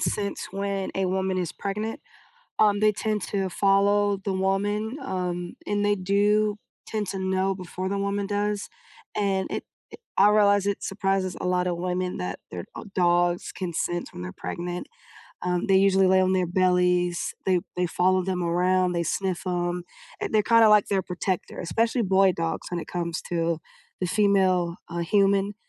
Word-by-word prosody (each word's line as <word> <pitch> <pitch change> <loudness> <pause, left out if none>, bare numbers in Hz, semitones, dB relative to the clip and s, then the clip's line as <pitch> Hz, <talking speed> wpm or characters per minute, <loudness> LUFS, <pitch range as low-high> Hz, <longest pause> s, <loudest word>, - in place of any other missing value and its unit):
sense 200 -1 -2
when 195 0 -2
a 190 -1 0
woman 190 0 0
is 175 -3 -2
pregnant. 210 +3 -4 0.6
Um, 205 -1 +4
they 215 0 +4
tend 215 0 -1
to 195 -2 -2
follow 200 +2 +3
the 195 - -1
woman, 205 +4 0
um, 180 -7 -3
and 205 0 0
they 205 0 +3
do 205 +2 +2 0.3
tend 215 -2 -2
to 190 +1 -4
know 190 0 0
before 185 0 -5
the 200 - -1
woman 200 0 -1
does 205 0 -1 0.5
and 195 -2 0
it - - -3 0.5
i 195 - +6
I - - +6
realize 205 -1 +4
it 200 - -1
surprises 195 -1 -1
a - - -3
lotta 180 0 +1
women 180 +1 -2
that 90 0 -4
their, 90 -1 -6
uh, - - -6
dogs 175 -1 +2
can 180 -3 -5
sense 175 +2 -2
when - - -7
they're 90 0 -5
pregnant. 175 - -5 0.5
Um, 180 0 -1
they 195 -1 +5
usually 195 0 +4
lay 190 0 +5
on 185 0 +2
their 185 -1 +1
bellies. 180 -1 +2
They 185 -2 +2 0.2
they 180 - +2
follow 185 +2 +2
them 180 -1 -1
around, 180 +2 +2
they 170 0 0
sniff 185 +1 -2
'em. 175 0 -1 0.4
Eh - - 0
they're 215 -1 +3
kinda 230 -1 +8
like 210 -1 +5
their 195 -1 +1
protector, 180 0 -3
especially 230 - 0
boy 190 -1 +4
dogs 165 -1 -3
when 175 - -1
it - - -9
comes 170 -1 -3
to 165 -1 0 0.4
the 180 - 0
female, 185 -3 +2
uh, 170 0 -4
human. 200 +3 +2
190 Hz, 175 wpm, -25 LUFS, 180-200 Hz, 0.6 s, kinda